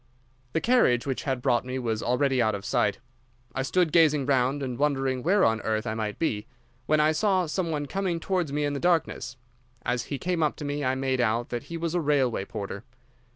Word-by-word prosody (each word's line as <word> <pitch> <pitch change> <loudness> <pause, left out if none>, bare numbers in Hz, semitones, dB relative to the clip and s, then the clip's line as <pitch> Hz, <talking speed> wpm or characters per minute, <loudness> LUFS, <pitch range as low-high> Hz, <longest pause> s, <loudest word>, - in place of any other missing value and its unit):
"The 160 - +1
carriage 225 - +3
which 135 -2 -3
had 130 -3 -2
brought 120 -1 +2
me 130 +1 -4
was 115 -4 -2
already 130 +1 +1
out 110 -2 +2
of 100 0 -7
sight. 105 +1 +1 0.6
I 135 - -1
stood 170 +4 +1
gazing 150 -4 +4
round 135 +1 +1
and 125 -2 -4
wondering 135 -3 +1
where 190 +7 +3
on 110 -1 +2
earth 110 +1 -1
I 110 - -2
might 110 -1 -3
be, 110 -11 -1 0.4
when 155 0 +3
I 155 +1 +4
saw 185 +2 +2
some 170 +2 -2
one 150 -2 -2
coming 185 +1 -2
towards 180 -4 -1
me 145 +1 0
in 145 - -1
the 140 - -2
darkness. 165 -7 0 0.5
As 120 -1 -1
he 140 - -4
came 175 +4 -1
up 150 -2 +1
to 150 - -7
me 145 0 -2
I 130 0 +1
made 130 -1 0
out 115 +1 0
that 120 -1 -4
he 170 - -6
was 165 0 -2
a 175 - +1
railway 135 -9 +1
porter. 100 -1 -6
135 Hz, 220 wpm, -27 LUFS, 120-160 Hz, 0.6 s, gazing